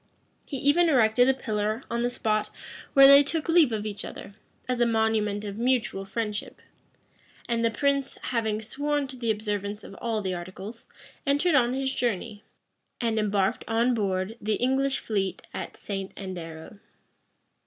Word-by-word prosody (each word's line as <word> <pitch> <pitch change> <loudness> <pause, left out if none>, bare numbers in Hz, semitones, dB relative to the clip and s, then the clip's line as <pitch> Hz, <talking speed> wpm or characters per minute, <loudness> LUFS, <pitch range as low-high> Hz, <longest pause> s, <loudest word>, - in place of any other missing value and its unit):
He 275 - -4
even 310 +6 +4
erected 245 -2 +4
a - - +5
pillar 215 -1 -2
on 235 0 0
the 240 - +1
spot 215 -3 0 0.4
where 275 -2 +9
they 280 +1 +10
took 300 +2 -2
leave 330 -6 +5
of 215 -1 -2
each 210 -1 -4
other, 200 - -9 0.3
as 250 -1 -1
a 240 - +4
monument 220 -2 +1
of 205 +1 -6
mutual 240 -5 0
friendship; 210 0 -4 0.9
and 235 -1 0
the 230 - +4
prince, 280 +3 0
having 220 -3 -1
sworn 290 +5 -1
to 260 - -8
the 240 -2 -3
observance 210 -1 -2
of - - -10
all 225 -3 -1
the 185 -1 -1
articles, 190 +6 -8 0.4
entered 290 +5 +3
on 250 -3 +3
his 265 0 -1
journey, 220 -2 -2 0.6
and 230 -2 0
embarked 205 +1 +1
on 230 +3 +2
board 195 0 -1
the 215 0 0
English 265 +2 +1
fleet 195 -4 -2
at - - -6
St. 195 -2 -5
Andero. 175 -1 -8
225 Hz, 160 wpm, -27 LUFS, 205-260 Hz, 0.9 s, they